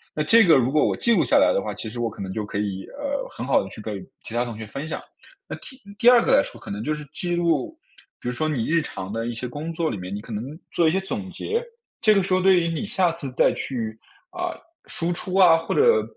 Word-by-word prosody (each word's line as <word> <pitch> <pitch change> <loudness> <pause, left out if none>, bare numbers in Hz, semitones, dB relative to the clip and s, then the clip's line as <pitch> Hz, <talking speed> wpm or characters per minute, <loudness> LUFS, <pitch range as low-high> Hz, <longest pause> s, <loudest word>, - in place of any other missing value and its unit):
那 150 - 0
这 225 +8 +6
个 165 -6 +6
如 130 0 +2
果 150 - +3
我 - - +1
记 235 - +4
录 - - +4
下 - - +2
来 - - +5
的 - - +1
话， - - -4
其 110 - -4
实 120 - -6
我 115 -1 0
可 100 - -8
能 95 0 -5
就 110 - -2
可 100 - -5
以， 100 -2 -3
呃， 280 -1 -2
很 120 - -6
好 135 - +3
地 95 - -7
去 - - -9
跟 105 -1 -4 0.3
其 115 - -7
他 120 +1 +1
同 115 -3 -6
学 110 - -6
分 140 +8 -6
享。 - - -3 0.5
那 - - -5
第 260 - -8 0.2
第 240 - +7
二 245 - +8
个 - - +2
来 280 - +6
说 - - -7
可 - - -8
能 105 +2 -4
就 155 +3 -1
是 150 0 -8
记 175 +2 -1
录 175 - 0 0.4
比 - - -7
如 - - +1
说 155 +6 -1
你 125 -7 -1
日 165 0 +2
常 95 -8 -6
的 115 +1 -2
一 - - -2
些 120 +2 -4
工 150 +7 -5
作 165 -1 -1
里 - - -3
面， 90 +1 -6
你 105 - -5
可 115 - -8
能 105 +3 -3 0.3
做 165 -2 +3
一 - - +1
些 190 - +1
总 190 0 -5
结。 460 - -2 0.4
这 215 -1 +5
个 195 - +3
时 185 - -1
候 185 - +3
对 185 -1 +5
于 170 - 0
你 165 +4 -2
下 180 -4 +2
次 165 -6 -6
再 - - +3
去， 115 -5 -4 0.4
啊， 360 -1 -4 0.3
输 170 +1 -1
出 185 +1 -4
啊， 180 -4 +7
或 165 - -3
者， 460 0 +4
155 Hz, 310 characters per minute, -24 LUFS, 115-190 Hz, 0.5 s, 二